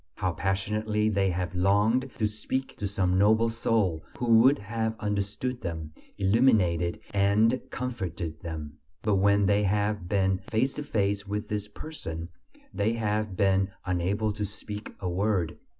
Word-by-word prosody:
How 95 -3 -1
passionately 105 +4 0
they 100 -2 +2
have 90 0 -2
longed 105 +8 +2
to 110 - +1
speak 110 +5 -3
to 105 - -1
some 95 -2 +1
noble 110 +3 +4
soul 110 -8 +1 0.2
who 115 -2 +5
would 130 +5 +6
have 110 +1 -2
understood 105 +5 -2
them, 80 -3 -5 0.2
illuminated 95 -5 +3
and 105 +5 +3
comforted 90 -10 -4
them! 75 -4 -6 0.2
But 105 -2 +2
when 100 +1 +4
they 100 +1 +3
have 105 -2 0
been 95 -2 +2
face 115 +6 0
to 150 - -5
face 100 -5 -1
with 105 +1 -3
this 105 -1 -2
person, 85 - -7 0.4
they 110 +3 +1
have 105 -3 -1
been 95 -1 +3 0.2
unable 95 +4 0
to 105 0 -4
speak 105 +1 -6
a 95 - -3
word. 90 -2 0
100 Hz, 150 wpm, -28 LUFS, 95-110 Hz, 0.4 s, would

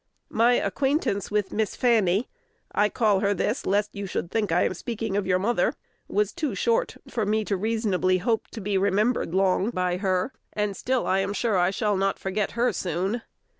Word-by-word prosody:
My 235 +2 +4
acquaintance 270 - 0
with 205 -2 0
Miss 215 -2 -1
Fanny 220 -3 +2 0.4
(I 210 0 +2
call 210 -4 +2
her 200 +1 +1
this, 230 +7 -1
lest 205 +2 +1
you 200 -1 -5
should 175 -1 -3
think 210 -5 0
I 175 - +3
am - - 0
speaking 225 +1 -4
of 200 -2 0
your 185 -1 +3
mother) 220 +6 +1 0.3
was 210 0 +1
too 315 -4 -2
short 480 +1 0
for 225 - -2
me 215 +1 +1
to 200 - 0
reasonably 200 -3 +1
hope 220 +4 0
to - - -8
long - - -8
be 200 0 0
remembered 195 0 +1
by 180 -1 0
her; 185 +5 0 0.2
and 210 -1 -1
still 255 +5 -1
I 190 - +2
am 195 +1 -1
sure 220 0 0
I 180 0 +3
shall 205 0 0
not 195 +1 0
forget 195 +2 -2
her 240 +1 +1
soon. 190 +6 -2
205 Hz, 195 wpm, -25 LUFS, 190-225 Hz, 0.4 s, My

